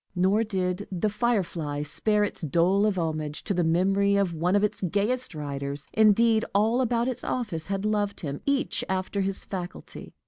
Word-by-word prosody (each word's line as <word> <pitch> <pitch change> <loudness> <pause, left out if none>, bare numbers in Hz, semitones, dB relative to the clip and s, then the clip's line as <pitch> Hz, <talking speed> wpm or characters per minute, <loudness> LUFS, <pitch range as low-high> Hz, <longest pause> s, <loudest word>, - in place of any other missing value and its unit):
Nor 190 +5 +3
did 190 -2 -2
"The 190 +3 0
Firefly" 185 -10 -1
spare 210 +7 +1
its 205 - -3
dole 175 +7 +2
of 200 -3 0
homage 155 -3 -3
to - - -1
the 175 -1 +1
memory 195 +4 +2
of 195 -3 +1
one 175 +4 +1
of 205 - +3
its 210 - -1
gayest 205 +4 -1
writers. 140 -1 -4
Indeed, 220 +1 +4
all 225 +5 +3
about 240 -1 +1
its 250 -1 -3
office 205 -11 -3
had 195 +1 -2
loved 205 -1 -1
him, 145 -3 -5
each 280 -1 0
after 190 +1 -1
his 195 0 -1
faculty. 180 -2 -7
195 Hz, 175 wpm, -26 LUFS, 170-215 Hz, -, Indeed